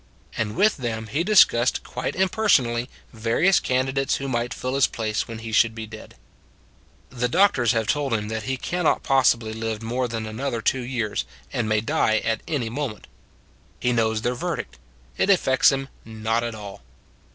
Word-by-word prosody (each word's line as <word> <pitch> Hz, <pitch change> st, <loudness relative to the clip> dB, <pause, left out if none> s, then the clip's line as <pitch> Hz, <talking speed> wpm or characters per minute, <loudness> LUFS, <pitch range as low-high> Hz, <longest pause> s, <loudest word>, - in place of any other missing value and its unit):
And 105 Hz, -1 st, -2 dB
with 210 Hz, +4 st, +3 dB
them 115 Hz, -4 st, -3 dB
he 145 Hz, +9 st, -1 dB
discussed 175 Hz, -, +4 dB
quite 125 Hz, -, -4 dB
impersonally 135 Hz, -, +2 dB, 0.2 s
various 115 Hz, -, +2 dB
candidates 135 Hz, +1 st, 0 dB
who 135 Hz, -, -4 dB
might 120 Hz, -2 st, -1 dB
fill 130 Hz, +1 st, -4 dB
his 140 Hz, -1 st, +4 dB
place 110 Hz, -1 st, -2 dB
when 115 Hz, -2 st, -7 dB
he 115 Hz, 0 st, -7 dB
should 115 Hz, 0 st, +3 dB
be 110 Hz, -1 st, -5 dB
dead. 110 Hz, 0 st, -12 dB, 1.0 s
The 125 Hz, -1 st, -1 dB
doctors 130 Hz, -, +3 dB
have 115 Hz, -1 st, 0 dB
told 140 Hz, -1 st, 0 dB
him 105 Hz, -1 st, -3 dB
that 110 Hz, 0 st, -3 dB
he 130 Hz, -, -1 dB
can 175 Hz, +6 st, -3 dB
not -, -, +2 dB
possibly 115 Hz, -4 st, +2 dB
live 110 Hz, 0 st, -4 dB
more 125 Hz, +3 st, -1 dB
than 115 Hz, -1 st, -4 dB
another 115 Hz, +3 st, -3 dB
two 125 Hz, +3 st, 0 dB
years, 120 Hz, -4 st, -2 dB, 0.3 s
and 110 Hz, -3 st, -1 dB
may 105 Hz, -1 st, +2 dB
die 110 Hz, 0 st, +1 dB
at 110 Hz, -1 st, 0 dB
any 140 Hz, -7 st, -1 dB
moment. 120 Hz, -2 st, -4 dB, 0.7 s
He 125 Hz, -, +1 dB
knows 110 Hz, -1 st, +1 dB
their 120 Hz, -, +1 dB
verdict: 65 Hz, -, -4 dB, 0.4 s
it -, -, +1 dB
affects 140 Hz, -10 st, +4 dB
him 135 Hz, 0 st, -2 dB, 0.2 s
not 110 Hz, +1 st, -2 dB
at 115 Hz, -1 st, -4 dB
all. 105 Hz, -1 st, -9 dB
120 Hz, 175 wpm, -24 LUFS, 110-135 Hz, 1.0 s, discussed